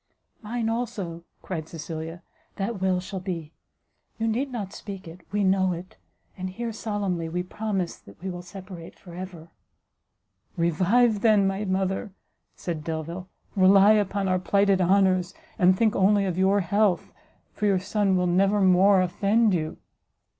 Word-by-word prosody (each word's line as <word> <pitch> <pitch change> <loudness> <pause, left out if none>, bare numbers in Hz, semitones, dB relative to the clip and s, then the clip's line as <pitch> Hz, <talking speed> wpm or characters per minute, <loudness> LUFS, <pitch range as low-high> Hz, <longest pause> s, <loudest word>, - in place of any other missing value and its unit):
"Mine, 230 +1 -3
also," 210 -8 -3 0.2
cried 160 -4 -5
Cecilia, 165 +1 -6 0.3
"that 195 0 -3
will 185 -1 +2
shall 190 +1 -6
be; 170 -4 -5 0.6
you 225 - -1
need 255 +5 -1
not 205 -6 -5
speak 195 -3 -8
it, 165 +3 -11
we 205 0 +1
know 190 -1 +3
it, 175 +2 -9 0.4
and 185 0 -4
here 230 +4 -5
solemnly 200 -7 -2
we 180 +2 -2
promise 190 -2 -3
that 100 - -17
we 190 - -6
will 175 0 -6
separate 180 -1 -10
for 175 - -13
ever." 175 -2 -8 1.1
"Revive, 200 +7 +3
then, 215 -3 +4
my 195 +2 -1
mother," 190 +1 -1 0.4
said 165 -4 -5
Delvile, 165 +4 -5 0.3
"rely 195 +1 +6
upon 200 -2 +1
our 185 0 +2
plighted 200 0 +2
honours, 185 0 +3 0.2
and 185 +1 +5
think 220 0 +2
only 200 +1 +3
of 185 -3 -1
your 190 +2 +3
health, 200 +1 +1 0.4
for 210 - -1
your 195 -2 +3
son 195 0 +1
will 180 - +1
never 195 +4 +3
more 190 0 +5
offend 205 +4 +2
you." 160 -2 -2
190 Hz, 155 wpm, -26 LUFS, 180-205 Hz, 1.1 s, rely